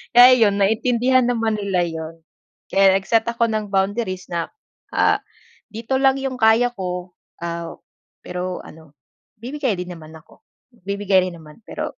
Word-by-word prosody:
Kaya 250 Hz, +1 st, +9 dB
yun 205 Hz, -3 st, +3 dB
naintindihan 245 Hz, +5 st, +2 dB
naman 225 Hz, -3 st, 0 dB
nila 195 Hz, -3 st, 0 dB
yun. 160 Hz, 0 st, -6 dB, 0.6 s
Kaya 195 Hz, -1 st, +5 dB
nag-set 220 Hz, +3 st, +1 dB
ako 235 Hz, 0 st, +1 dB
ng 215 Hz, -1 st, -2 dB
boundaries 195 Hz, -1 st, -1 dB
na 170 Hz, -1 st, -2 dB, 0.5 s
ah, -, -, +3 dB, 0.5 s
"Dito 230 Hz, +4 st, -3 dB
lang 270 Hz, 0 st, +3 dB
yung 265 Hz, -1 st, -3 dB
kaya 225 Hz, +2 st, +5 dB
ko," 180 Hz, -2 st, -5 dB, 0.3 s
ah, 170 Hz, 0 st, -5 dB, 0.5 s
pero 180 Hz, 0 st, -4 dB
ano 160 Hz, -2 st, -15 dB, 0.5 s
bibigay 260 Hz, -4 st, -2 dB
din 180 Hz, 0 st, -6 dB
naman 160 Hz, -1 st, -13 dB
ako, 160 Hz, -, -17 dB, 0.5 s
bibigay 200 Hz, -2 st, +2 dB
rin 170 Hz, -, -10 dB
naman, 155 Hz, +4 st, -15 dB
pero -, -, -6 dB
200 Hz, 145 wpm, -21 LUFS, 180-235 Hz, 0.6 s, Kaya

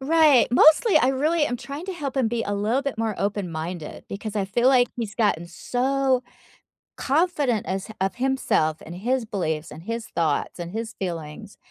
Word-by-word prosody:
Right, 300 Hz, -2 st, +5 dB
mostly, 310 Hz, -, +6 dB
I 255 Hz, -, +3 dB
really 300 Hz, +4 st, +2 dB
am 245 Hz, -3 st, -2 dB
trying 285 Hz, +7 st, -7 dB
to 385 Hz, -, -3 dB
help 285 Hz, -6 st, -5 dB
him 260 Hz, -4 st, +2 dB
be 230 Hz, 0 st, -1 dB
a 205 Hz, -, -2 dB
little 215 Hz, +6 st, +1 dB
bit 280 Hz, -5 st, -3 dB
more 220 Hz, -2 st, -1 dB
open 200 Hz, -2 st, -2 dB
minded 160 Hz, 0 st, -6 dB
because 210 Hz, +2 st, -6 dB
I 200 Hz, -, +1 dB
feel 235 Hz, +6 st, +1 dB
like 250 Hz, -2 st, +5 dB
he's 215 Hz, -4 st, -4 dB
gotten 205 Hz, -7 st, +1 dB
so 255 Hz, +8 st, 0 dB, 0.7 s
confident 285 Hz, -, +1 dB
as 190 Hz, +1 st, -3 dB
of 195 Hz, 0 st, -1 dB
himself, 245 Hz, -12 st, +1 dB
and 170 Hz, +2 st, -8 dB
his 245 Hz, +5 st, 0 dB
beliefs, 165 Hz, -7 st, -3 dB
and 165 Hz, -, -11 dB
his 230 Hz, +1 st, -4 dB
thoughts, 160 Hz, -1 st, -1 dB
and 175 Hz, 0 st, -6 dB
his 225 Hz, +1 st, -4 dB
feelings 175 Hz, +2 st, -6 dB
230 Hz, 185 wpm, -24 LUFS, 190-265 Hz, 0.7 s, mostly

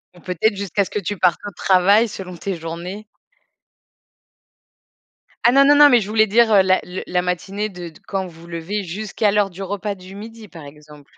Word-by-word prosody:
Ou -, -, -16 dB
peut-être, 200 Hz, +3 st, 0 dB
jusqu'à 200 Hz, 0 st, -1 dB
ce -, -, -10 dB
que 210 Hz, -, -3 dB
tu 200 Hz, +1 st, -4 dB
partes 175 Hz, 0 st, +2 dB
au 205 Hz, -, -5 dB
travail 195 Hz, +5 st, +3 dB
selon 185 Hz, -3 st, -8 dB
tes 195 Hz, +2 st, -4 dB
journées? 170 Hz, +5 st, -7 dB, 2.4 s
Ah 240 Hz, -, +6 dB
non, 275 Hz, +1 st, +6 dB
non, 290 Hz, +1 st, +6 dB
non, 290 Hz, 0 st, +8 dB
mais 245 Hz, -2 st, +5 dB
je 205 Hz, -, -6 dB
voulais 220 Hz, 0 st, +3 dB
dire, 225 Hz, +2 st, +3 dB
heu, 195 Hz, -, +7 dB
la 185 Hz, 0 st, +2 dB
le 180 Hz, +1 st, -7 dB
la 180 Hz, 0 st, 0 dB
matinée 195 Hz, +4 st, -3 dB
de 175 Hz, -2 st, -9 dB
d 155 Hz, -, -19 dB
quand 190 Hz, -2 st, -3 dB
vous 165 Hz, -1 st, -15 dB
vous 170 Hz, -, -14 dB
levez, 170 Hz, +5 st, -4 dB
jusqu'à 205 Hz, +3 st, -2 dB
l'heure 205 Hz, -1 st, +1 dB
du 190 Hz, +2 st, -8 dB
repas 200 Hz, +1 st, -4 dB
du 185 Hz, +1 st, -13 dB
midi, 220 Hz, +1 st, -10 dB
par 165 Hz, -4 st, -12 dB
exemple. 150 Hz, 0 st, -15 dB
195 Hz, 210 wpm, -20 LUFS, 180-210 Hz, 2.4 s, non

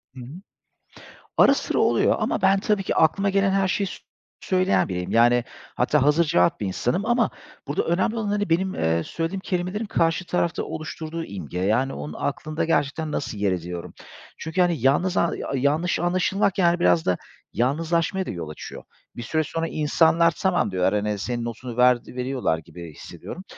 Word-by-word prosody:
Hı -, -, -9 dB
hı. -, -, -8 dB, 1.1 s
Ara -, -, +7 dB
sıra -, -, -1 dB
oluyor -, -, +3 dB
ama -, -, -1 dB
ben, 195 Hz, 0 st, +4 dB
tabii 210 Hz, -1 st, 0 dB
ki, -, -, -2 dB
aklıma 195 Hz, +5 st, +3 dB
gelen 195 Hz, 0 st, +2 dB
her 195 Hz, -1 st, +2 dB
şeyi 195 Hz, +1 st, 0 dB
s -, -, -6 dB, 0.5 s
söyleyen 185 Hz, +1 st, +2 dB
biriyim, 90 Hz, 0 st, -3 dB
yani, 120 Hz, +1 st, +4 dB, 0.3 s
hatta 135 Hz, +3 st, +2 dB
hazırcevap 150 Hz, -, +3 dB
bir 105 Hz, -, -2 dB
insanım 125 Hz, -, -1 dB
ama 240 Hz, -1 st, +2 dB, 0.4 s
burada 145 Hz, -, 0 dB
önemli 185 Hz, +7 st, 0 dB
olan, 220 Hz, -2 st, -2 dB
hani, 205 Hz, -3 st, -1 dB
benim, 185 Hz, +3 st, +1 dB
eee, 80 Hz, +1 st, +1 dB
söylediğim 165 Hz, +4 st, -3 dB
kelimelerin 185 Hz, +4 st, -2 dB
karşı 165 Hz, -1 st, 0 dB
tarafta 175 Hz, -1 st, -1 dB
oluşturduğu 160 Hz, +1 st, -5 dB
imge, 90 Hz, -, -6 dB
yani 115 Hz, +8 st, +1 dB
onun 75 Hz, +1 st, -6 dB
aklında 155 Hz, +3 st, -2 dB
gerçekten 155 Hz, 0 st, 0 dB
nasıl 125 Hz, -7 st, -3 dB
yer 100 Hz, -1 st, +1 dB
ediyorum? 90 Hz, -1 st, -5 dB, 0.4 s
Çünkü, 160 Hz, +3 st, -1 dB
hani, 175 Hz, -2 st, +2 dB
yalnız 175 Hz, +8 st, +2 dB
a 170 Hz, -, +2 dB, 0.2 s
yanlış 150 Hz, +7 st, +1 dB
anlaşılmak, 185 Hz, +3 st, +1 dB
yani, 175 Hz, -1 st, +3 dB
biraz 170 Hz, -1 st, +3 dB
da, 90 Hz, -, +1 dB, 0.4 s
yalnızlaşmaya 165 Hz, -, 0 dB
da -, -, -6 dB
yol 85 Hz, -4 st, -6 dB
açıyor. 75 Hz, -, -9 dB, 0.3 s
Bir 120 Hz, -, -6 dB
süre 160 Hz, +7 st, 0 dB
sonra 165 Hz, +2 st, -3 dB
insanlar 165 Hz, +2 st, +3 dB
tamam 175 Hz, -, 0 dB
diyorlar, 95 Hz, +2 st, +1 dB
hani, 105 Hz, 0 st, -1 dB
senin 120 Hz, +3 st, -3 dB
notunu 120 Hz, +1 st, -6 dB
ver, 125 Hz, 0 st, +6 dB
veriyorlar 125 Hz, -8 st, -1 dB
gibi 80 Hz, 0 st, -11 dB
hissediyorum. 185 Hz, -, -9 dB
160 Hz, 170 wpm, -24 LUFS, 120-180 Hz, 1.1 s, Ara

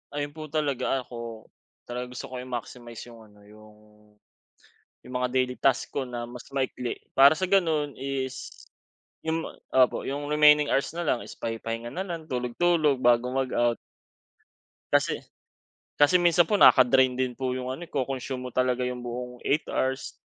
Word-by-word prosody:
Ayun 145 Hz, 0 st, -2 dB
po 155 Hz, +1 st, -8 dB
talaga, 140 Hz, -4 st, -1 dB
ako 115 Hz, -2 st, -8 dB, 0.4 s
talagang 125 Hz, +1 st, -6 dB
gusto 125 Hz, -, -7 dB
ko 130 Hz, -, -5 dB
i-maximize 120 Hz, -2 st, -7 dB
yung 115 Hz, -, -14 dB
ano 105 Hz, 0 st, -21 dB
yung 105 Hz, +1 st, -16 dB, 1.3 s
yung 125 Hz, -, -10 dB
mga 125 Hz, 0 st, 0 dB
daily 125 Hz, -1 st, +1 dB
task 135 Hz, -2 st, +2 dB
ko 140 Hz, -, -1 dB
na 120 Hz, -1 st, -5 dB
mas 120 Hz, 0 st, -10 dB
maikli 130 Hz, -2 st, -2 dB, 0.2 s
para 140 Hz, +2 st, +8 dB
sa 185 Hz, -, -1 dB
gano'n 160 Hz, -7 st, +2 dB
is 135 Hz, -1 st, -4 dB, 0.7 s
yung 160 Hz, 0 st, -1 dB, 0.3 s
opo, 130 Hz, -1 st, +3 dB
yung 145 Hz, +1 st, -3 dB
remaining 150 Hz, -1 st, +6 dB
hours 140 Hz, -, +1 dB
na 175 Hz, -, -2 dB
lang 120 Hz, -, +1 dB
is -, -, -10 dB
pahi-pahinga 115 Hz, +1 st, -4 dB
na 190 Hz, -, -3 dB
lang 170 Hz, -3 st, -5 dB
tulog-tulog 140 Hz, +3 st, +1 dB
bago 120 Hz, 0 st, +4 dB
mag-out. 125 Hz, -3 st, +1 dB, 1.2 s
Kasi -, -, +2 dB, 0.8 s
kasi 145 Hz, +5 st, +5 dB
minsan 175 Hz, 0 st, +5 dB
po 210 Hz, -, +3 dB
naka-drain 130 Hz, 0 st, +6 dB
din 130 Hz, 0 st, 0 dB
po 130 Hz, -1 st, -1 dB
'yong 130 Hz, 0 st, -4 dB
ano, 135 Hz, -, -6 dB
eh, -, -, -26 dB
co-consume 130 Hz, -1 st, -3 dB
mo -, -, -17 dB
talaga 125 Hz, 0 st, +1 dB
'yong 125 Hz, 0 st, -3 dB
buong 125 Hz, +1 st, -5 dB
8 150 Hz, +3 st, +2 dB
hours 130 Hz, 0 st, -2 dB
130 Hz, 160 wpm, -27 LUFS, 125-145 Hz, 1.3 s, para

